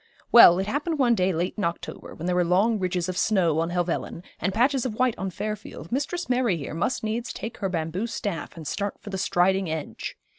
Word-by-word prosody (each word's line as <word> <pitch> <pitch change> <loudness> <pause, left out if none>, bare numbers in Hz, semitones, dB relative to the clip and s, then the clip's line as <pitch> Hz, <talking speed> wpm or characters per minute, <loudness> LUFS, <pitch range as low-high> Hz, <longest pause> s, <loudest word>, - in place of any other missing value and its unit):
Well, 175 -7 +9
it 190 - 0
happened 290 - -1
one 250 -4 +4
day 190 -3 +2
late 175 +2 -1
in - - -1
October, 170 -1 -4
when 165 - -7
there 180 - +1
were 180 - +3
long 200 +6 +2
ridges 180 -2 -1
of 185 - -3
snow 175 -7 +2
on 165 +1 0
Helvellyn, 175 -1 -2 0.2
and 185 - 0
patches 250 +5 +2
of 240 -5 -3
white 255 0 +2
on 190 - -2
Fairfield, 205 -4 -6
Mistress 290 +7 -2
Mary 245 -7 +1
here 145 - -6
must 170 +11 -1
needs 220 +2 -2
take 225 - -6
her 195 - -2
bamboo 170 +5 -2
staff 200 -7 -4
and 160 - -8
start 200 +5 -2
for 205 - -9
the 190 - -3
Striding 190 -1 +2
Edge. 155 -2 -5
190 Hz, 220 wpm, -25 LUFS, 175-230 Hz, 0.2 s, Well